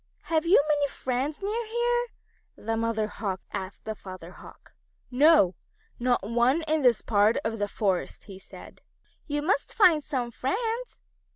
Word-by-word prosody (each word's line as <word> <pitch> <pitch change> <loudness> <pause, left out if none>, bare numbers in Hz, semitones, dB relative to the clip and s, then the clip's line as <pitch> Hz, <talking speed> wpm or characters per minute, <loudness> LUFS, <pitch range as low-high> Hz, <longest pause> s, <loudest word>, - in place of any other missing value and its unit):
"Have 325 0 0
you 365 - +7
many 290 -2 +2
friends 270 +6 -3
near 445 +4 -2
here?" 480 +1 0 0.5
the 225 +1 -3
Mother 225 -1 0
Hawk 205 -3 -4
asked 190 +1 -6
the 220 - -3
Father 185 -4 -10
Hawk. - - -15 0.4
"No, 275 - +5 0.5
not 245 -4 +1
one 240 +7 +2
in 310 0 +1
this 245 -6 +3
part 210 +1 +3
of 225 0 -2
the 205 - 0
forest," 195 -3 -2
he 195 -3 -11
said. - - -13 0.5
"You 290 -1 -2
must 375 +7 0
find 345 -9 +5
some 250 -5 -3
friends. 455 - -3
255 Hz, 155 wpm, -27 LUFS, 215-325 Hz, 0.5 s, you